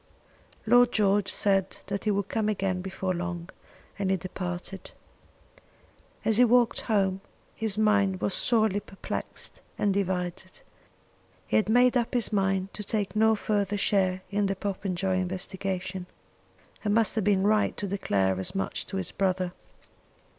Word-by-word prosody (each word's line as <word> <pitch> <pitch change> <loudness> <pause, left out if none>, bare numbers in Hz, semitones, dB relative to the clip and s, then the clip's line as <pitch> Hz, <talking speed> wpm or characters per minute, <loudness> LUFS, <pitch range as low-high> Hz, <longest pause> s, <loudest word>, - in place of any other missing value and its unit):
Lord 245 +2 +5
George 205 -1 +2
said 195 -2 +1
that 200 +2 -4
he - - +2
would 200 -1 0
come 215 -1 0
again 190 -3 -1
before 190 0 -3
long, 175 0 -4 0.5
and 195 -2 0
then 190 - +2
departed. 180 +1 -6 1.4
As 220 -1 +2
he 250 - +7
walked 240 -1 +3
home 195 -3 +1 0.3
his 220 -2 -2
mind 200 -3 +3
was 195 - -1
sorely 220 -4 +3
perplexed 195 -1 -7 0.2
and 200 -1 +1
divided. 180 -3 -3 0.8
He 110 - +1
had 110 - +1
made 245 +2 +5
up 240 0 0
his 235 -2 0
mind 195 -1 0
to 210 - -5
take 205 0 -2
no 220 +1 +4
further 205 -1 -1
share 185 -2 +1
in 205 0 +1
the 195 - -1
Popenjoy 190 -1 -2
investigation, 185 0 -4 0.8
and 205 -1 +1
must 225 -2 +3
have 220 - 0
been 195 -1 +2
right 215 0 +2
to 205 - -3
declare 100 - 0
as 95 - -3
much 195 - -2
to 195 - -4
his 190 -2 -3
brother. 185 -2 0
195 Hz, 150 wpm, -27 LUFS, 185-210 Hz, 1.4 s, he